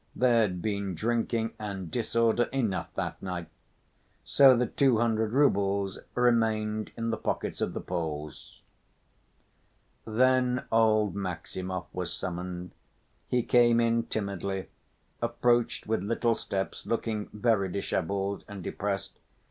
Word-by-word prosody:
There 120 -2 +4
had 90 -5 -1
been 100 -3 -2
drinking 115 +3 0
and 100 -5 -5
disorder 115 0 +2
enough, 110 -10 -1
that - - -3
night.... 90 -3 -5 0.8
So 135 -3 +7
the 125 - +2
two 135 -1 +3
hundred 110 -1 +1
roubles 100 -7 +2 0.2
remained 110 -3 +1
in 115 0 -1
the 110 - -1
pockets - - -3
of - - -1
the - - -4
Poles. 75 -4 -5 1.4
Then 125 +2 +2
old 110 -2 +3
Maximov 95 0 -4
was 90 -1 -3
summoned. 90 0 -5 0.6
He 125 -1 +1
came 120 -1 +5
in 115 0 +2
timidly, 100 -2 -3 0.5
approached 120 0 +1
with 110 -3 0
little 115 +3 +1
steps, 95 -3 -4
looking 110 -2 -2
very 105 -3 +1
disheveled 100 +1 -2
and 100 -3 -8
depressed. 100 +1 -3
110 Hz, 120 wpm, -29 LUFS, 95-115 Hz, 1.4 s, So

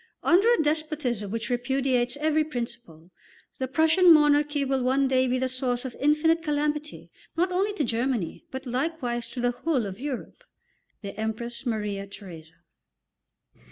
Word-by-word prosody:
Under 395 +7 +5
a 405 -10 +3
despotism 300 -8 -1
which 230 +3 -3
repudiates 250 0 0
every 310 +1 +2
principle, 235 - -7 0.5
the 260 - -1
Prussian 320 +6 +5
monarchy 295 -2 +4
will 265 -1 0
one 265 +2 +2
day 260 0 +2
be 250 +1 +1
the 260 0 0
source 255 -1 -2
of 255 - -6
infinite 305 +3 +3
calamity, 300 0 -2 0.3
not 360 +2 +2
only 390 +3 +1
to 305 - 0
Germany, 235 - -1
but 265 +1 -7
likewise 250 -2 -2
to 255 - -8
the 245 0 +2
whole 255 -1 -1
of 195 +1 -7
Europe." 270 -2 -6 0.6
THE 200 - -6
EMPRESS 235 +3 -4
MARIA 210 -3 -2
THERESA. 175 -6 -11
260 Hz, 150 wpm, -26 LUFS, 235-300 Hz, 0.6 s, Under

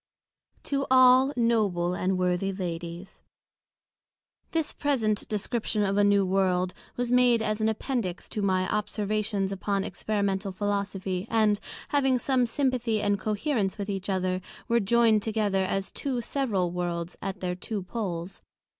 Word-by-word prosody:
To 275 -1 -1
all 255 +1 +6
Noble 205 -7 +2
and 185 +1 0
Worthy 180 +1 0
Ladies. 175 -1 -6 1.3
This 320 -2 -1
present 225 -8 0
Description 215 0 -1
of 195 0 0
a 205 - +4
New 200 -1 +4
World, 185 -1 +1 0.2
was 245 0 -1
made 245 -2 +4
as 215 0 -1
an 220 - +3
Appendix 220 -5 -3
to 210 - -3
my 185 -2 +1
Observations 210 -1 -1
upon 195 0 -1
Experimental 200 -2 -1
Philosophy; 200 -1 -2
and, 215 -2 +3 0.3
having 270 -3 +3
some 250 -1 +1
Sympathy 245 -4 0
and 205 -1 +1
Coherence 215 -1 -1
with 200 0 -3
each 195 0 -4
other, 185 -1 0 0.3
were 235 0 +3
joyned 225 0 +4
together 205 -3 0
as 195 +1 -2
Two 265 -3 -2
several 220 -9 -1
Worlds, 175 -1 -3
at 195 -1 -4
their 180 -1 -2
Two 195 +2 -4
Poles. 185 -3 -4
205 Hz, 140 wpm, -27 LUFS, 190-230 Hz, 1.3 s, all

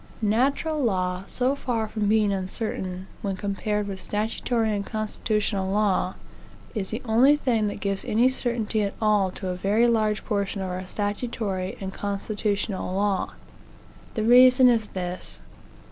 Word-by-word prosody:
"Natural 275 +8 +1
law, 185 -6 0
so 255 +2 0
far 235 -5 -2
from 215 -1 -2
being 210 -2 +3
uncertain, 190 -1 -3 0.2
when 195 -2 -2
compared 205 +2 -2
with 195 -2 -5
statutory 220 +2 -1
and 200 - -2
constitutional 210 -2 -1
law, 200 -2 +1 0.6
is 205 -5 -2
the 225 +3 -4
only 245 +6 +5
thing 235 -7 +1
that 205 - -4
gives 195 -1 -1
any 230 +4 +3
certainty 235 -4 -1
at 200 -1 -2
all 210 -3 +3
to 185 +1 -6
a 180 - -2
very 205 +6 +2
large 215 -3 +1
portion 200 -2 -1
of 185 - -3
our 185 +1 -5
statutory 205 -2 -3
and 190 -1 -5
constitutional 200 -1 -2
law. 200 -1 0 0.8
The 220 - 0
reason 250 +2 +7
is 225 -3 +2
this. 180 - -5
210 Hz, 145 wpm, -25 LUFS, 195-225 Hz, 0.8 s, reason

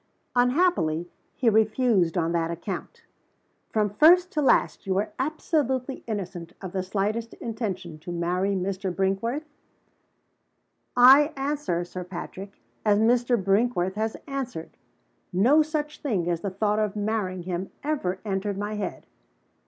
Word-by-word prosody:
"Unhappily, 245 - +2 0.3
he 255 - -1
refused 220 -4 +3
on 165 -1 +1
that 165 -1 0
account." 170 +3 -6 0.7
"From 215 -1 +1
first 350 - +6
to 300 - 0
last, 265 - +2
you 190 - +1
were 205 +2 0
absolutely 270 -3 -1
innocent 180 -5 -5
of 190 -2 -7
the 190 - -1
slightest 210 +4 -2
intention 190 -8 -5
to 175 - -7
marry 180 +3 0
Mr. 190 0 -2
Brinkworth?" 195 - -1 1.5
"I 270 +5 +8
answer, 275 - -1
Sir 180 +1 -6
Patrick, 190 +2 -8 0.2
as 210 -2 +4
Mr. 240 +2 +3
Brinkworth 195 -1 +1
has 220 +2 -2
answered. 265 - -5 0.6
No 240 - +5
such 300 -1 -3
thing 200 - -1
as 170 -1 -1
the 200 - -2
thought 210 +2 0
of 215 -2 -1
marrying 205 -4 -2
him 180 +1 -3
ever 275 -12 -1
entered 195 0 -2
my 205 +1 -3
head." 210 -1 -4
205 Hz, 135 wpm, -26 LUFS, 185-250 Hz, 1.5 s, I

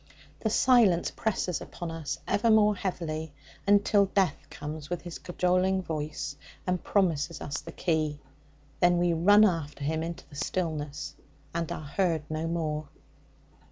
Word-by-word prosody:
The 220 - 0
silence 220 -7 +4
presses 190 -7 -1
upon 175 -2 -6
us 165 -3 -4
ever 230 +3 +2
more 210 -1 +5
heavily 160 -5 -3 0.3
until 205 0 +5
Death 190 -6 0
comes 150 0 -7
with 175 -1 -3
his 175 -2 -7
cajoling 185 +1 +1
voice 150 -3 -4 0.3
and 180 -1 -1
promises 170 -5 +1
us 145 0 -4
the - - -9
key. 155 -4 0 0.6
Then 175 -1 +4
we 175 0 +2
run 205 +6 +6
after 160 -6 -1
him 160 +2 0
into 170 +2 -5
the 145 - -14
stillness, 150 -3 -3 0.4
and 165 -1 -2
are 155 - -5
heard 165 0 0
no 155 +1 -2
more. 155 -2 -2
170 Hz, 145 wpm, -29 LUFS, 155-190 Hz, 0.6 s, run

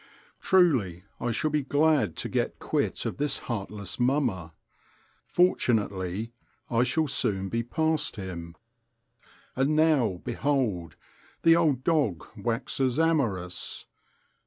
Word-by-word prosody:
Truly, 130 - +3 0.2
I 120 - -2
shall 135 +7 0
be 150 0 +1
glad 145 - +2
to - - -4
get - - -1
quit - - -1
of - - -3
this 145 -1 +1
heartless 105 -3 -5
mummer. 120 - +1 0.8
Fortunately 110 - +1 0.4
I 115 0 +3
shall 130 +6 +2
soon 100 -8 0
be 115 +3 -1
past 160 +6 0
him. 85 -4 -7 1.0
And 135 +4 +1
now, 145 - +3
behold! 120 - -1 0.5
the 165 0 +7
old 150 -7 +2
dog 140 - +1
waxes 120 +4 -1
amorous. 115 - -1
120 Hz, 110 wpm, -27 LUFS, 95-150 Hz, 1.0 s, the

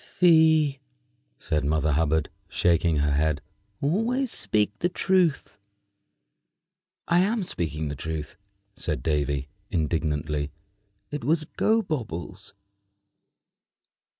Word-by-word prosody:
"Fie!" 160 -5 +4 0.6
said 75 -3 -1
Mother 75 +1 +1
Hubbard, 80 +1 +1 0.2
shaking 85 -1 +2
her 75 0 +1
head; 75 +1 +1 0.4
"always 225 - +1
speak 105 0 0
the 175 - +1
truth." 180 - +1 1.5
"I 170 +1 +4
am 205 +3 +1
speaking 80 - -3
the 70 - -4
truth," 80 +1 -5 0.4
said 75 -3 -3
Davy, 70 -3 0 0.2
indignantly. 75 -2 -1 0.6
"It 145 -3 -4
was 155 +4 +1
Gobobbles." 155 - -2
85 Hz, 95 wpm, -26 LUFS, -, 1.5 s, Fie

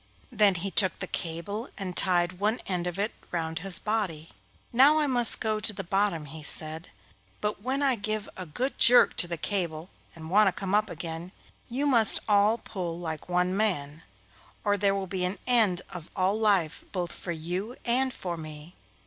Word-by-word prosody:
Then 210 -4 +4
he 190 +3 -3
took 190 -3 +4
the - - -4
cable 175 +7 -5
and 185 -3 -5
tied 180 -1 +1
one 215 +4 0
end 180 -2 -2
of 175 +1 -4
it 205 +3 -1 0.2
round 160 -2 -3
his 190 +1 +3
body. 190 -8 -3 0.4
'Now 275 +6 +6
I 305 - +2
must 245 -4 +4
go 215 -1 -1
to 215 +1 +2
the 195 0 -5
bottom,' 195 -4 0
he 155 +2 -9
said, 155 +2 -4 0.5
'but 210 -1 -3
when 265 +5 -1
I 275 -2 +3
give 215 0 -3
a 185 -2 -8
good 255 - -3
jerk 245 +1 +7
to 175 - +7
the 170 0 -4
cable 170 -2 -3 0.2
and 160 0 -10
want 210 +1 +5
to 190 - -1
come 195 -1 -3
up 210 +1 +2
again, 165 +2 -7 0.4
you 265 +4 -2
must 235 -7 +5
all 210 +2 +4
pull 180 -7 -5
like 160 -1 -6
one 180 +1 +1
man, 165 -8 -1 0.6
or 205 -1 +2
there 200 -1 +1
will 195 -1 -3
be 185 0 -4
an 180 +2 -2
end 220 -8 +3
of 175 -2 -9
all 185 +1 +1
life 195 -8 +1
both 180 -3 -3
for 175 - -5
you 180 +8 -4
and 255 +2 +1
for 175 -7 -5
me. 155 +1 -10
190 Hz, 190 wpm, -27 LUFS, 170-215 Hz, 0.6 s, jerk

